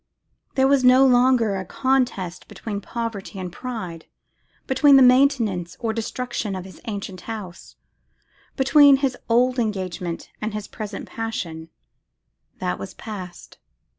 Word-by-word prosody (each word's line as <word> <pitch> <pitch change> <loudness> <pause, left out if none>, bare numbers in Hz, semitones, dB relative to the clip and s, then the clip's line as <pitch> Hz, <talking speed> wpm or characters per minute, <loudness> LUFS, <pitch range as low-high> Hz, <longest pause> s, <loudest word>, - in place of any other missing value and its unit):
There 265 -1 +4
was 275 -1 +3
no 255 +2 +7
longer 245 -4 +4
a 190 - -3
contest 245 -8 -1
between 205 -3 -6
poverty 225 -2 -5
and 180 -2 -6
pride, 185 -10 -6 0.6
between 275 +2 +5
the 270 - +8
maintenance 250 -9 +3
or 225 -2 -1
destruction 230 -2 -3
of 185 -1 -6
his 185 -3 -13
ancient 200 -4 -5
house, 200 -6 -8 0.8
between 280 +1 +6
his 260 -2 -1
old 250 +2 +3
engagement 185 -6 -3
and 215 0 -3
his 210 -1 -5
present 210 -2 -7
passion; 170 -8 -5 0.9
that 90 0 -3
was 100 - -8
past. 185 -5 -9
220 Hz, 130 wpm, -23 LUFS, 185-255 Hz, 0.9 s, the